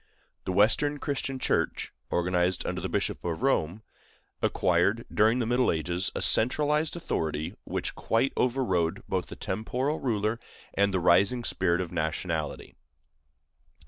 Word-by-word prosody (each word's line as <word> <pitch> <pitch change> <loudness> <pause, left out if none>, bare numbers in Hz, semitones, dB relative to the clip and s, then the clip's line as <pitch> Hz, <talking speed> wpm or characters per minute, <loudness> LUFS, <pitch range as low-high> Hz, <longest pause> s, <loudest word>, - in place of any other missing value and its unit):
The - - -1
Western 115 +10 +3
Christian 140 -2 -2
Church, - - -1 0.2
organized 90 +1 +1
under 90 0 -3
the 95 - -3
Bishop 100 +3 -2
of 85 +6 -3
Rome, 105 - +1 0.6
acquired, 95 +6 +2
during 110 +3 +4
the 120 - 0
middle 125 +2 +2
ages, 85 +3 -1
a - - -1
centralized 150 +7 +2
authority 80 - -2
which - - -3
quite 115 +4 0
overrode 105 -10 0
both - - -1
the - - -8
temporal 125 +9 -2
ruler 110 -2 -1 0.3
and 100 0 +2
the 95 - +1
rising 100 +7 +3
spirit 90 -5 +1
of 90 - -5
nationality. 80 -1 -3
100 Hz, 135 wpm, -28 LUFS, 90-125 Hz, 0.6 s, during